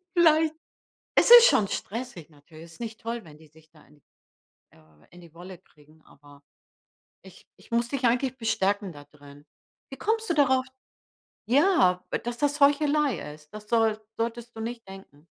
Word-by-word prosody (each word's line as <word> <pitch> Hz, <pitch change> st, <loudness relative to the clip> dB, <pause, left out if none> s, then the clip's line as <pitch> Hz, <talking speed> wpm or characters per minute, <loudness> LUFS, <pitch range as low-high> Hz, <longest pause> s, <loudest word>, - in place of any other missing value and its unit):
vielleicht 320 Hz, -2 st, +3 dB, 0.6 s
Es -, -, +4 dB
ist 480 Hz, 0 st, +11 dB
schon 205 Hz, -, +2 dB
stressig 215 Hz, -9 st, -6 dB
natürlich. 155 Hz, +2 st, -16 dB
Es 165 Hz, -, -15 dB
ist -, -, -20 dB
nicht 225 Hz, -1 st, -7 dB
toll, 230 Hz, -1 st, -5 dB
wenn 155 Hz, -3 st, -15 dB
die 160 Hz, 0 st, -19 dB
sich 160 Hz, +1 st, -23 dB
da 155 Hz, -2 st, -21 dB
in 150 Hz, 0 st, -24 dB, 0.7 s
äh, -, -, -23 dB, 0.3 s
in 175 Hz, -, -16 dB
die 170 Hz, -2 st, -17 dB
Wolle 180 Hz, +2 st, -11 dB
kriegen, 155 Hz, +1 st, -25 dB
aber 145 Hz, 0 st, -20 dB, 0.8 s
ich -, -, -17 dB
ich -, -, -21 dB
muss 235 Hz, 0 st, 0 dB
dich 275 Hz, -1 st, -2 dB
eigentlich 250 Hz, +2 st, 0 dB
bestärken 205 Hz, -3 st, -1 dB
da 145 Hz, -1 st, -13 dB
drin. 145 Hz, 0 st, -17 dB, 0.5 s
Wie 270 Hz, -, -8 dB
kommst 445 Hz, 0 st, -2 dB
du -, -, +2 dB
darauf 260 Hz, -4 st, +2 dB, 0.8 s
ja, 275 Hz, -, +3 dB, 0.2 s
dass 240 Hz, 0 st, -5 dB
das 290 Hz, +1 st, -1 dB
Heuchelei 285 Hz, -, +1 dB
ist? 150 Hz, 0 st, -19 dB
Das 210 Hz, 0 st, -10 dB
soll 225 Hz, -2 st, +1 dB, 0.2 s
solltest 235 Hz, +1 st, -5 dB
du 225 Hz, -, -7 dB
nicht 230 Hz, 0 st, -7 dB
denken. 190 Hz, -6 st, -14 dB
225 Hz, 170 wpm, -26 LUFS, 160-265 Hz, 0.8 s, ist